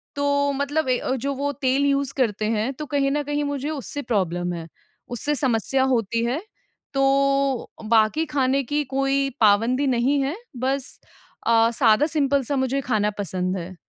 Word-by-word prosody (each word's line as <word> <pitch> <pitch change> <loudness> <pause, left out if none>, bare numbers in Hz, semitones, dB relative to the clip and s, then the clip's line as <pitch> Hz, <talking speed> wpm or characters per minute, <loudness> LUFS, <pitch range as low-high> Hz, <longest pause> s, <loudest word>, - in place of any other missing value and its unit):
तो 285 0 +1
मतलब 280 +1 -1
अ, 255 +1 0
जो 275 +3 -2
वो 285 +1 -2
तेल 270 +2 +2
यूज़ 275 -1 +1
करते 220 -5 0
हैं, 225 +4 0
तो 300 +3 -6
कहीं 275 0 0
न 295 +1 0
कहीं 290 +1 -2
मुझे 285 0 -3
उससे 290 -1 -5
प्रॉब्लम 180 -7 -1
है, 165 -1 -6 0.4
उससे 290 +5 -2
समस्या 260 0 +1
होती 230 0 0
है। 265 +8 -1 0.5
तो 275 -1 +2 0.2
बाकी 230 +8 +3
खाने 275 -1 +1
की 295 +4 -1
कोई 275 0 +1
पाबंदी 230 +7 +3
नहीं 260 +3 +2
है। 280 +5 -1 0.2
बस 265 +2 -2 0.5
अ, 230 0 +5
सादा 230 +3 +4
सिंपल 280 -3 +1
सा 280 +4 -2
मुझे 265 +1 0
खाना 215 -5 0
पसंद 185 0 -2
है। 180 +1 -7
270 Hz, 165 wpm, -23 LUFS, 230-280 Hz, 0.5 s, अ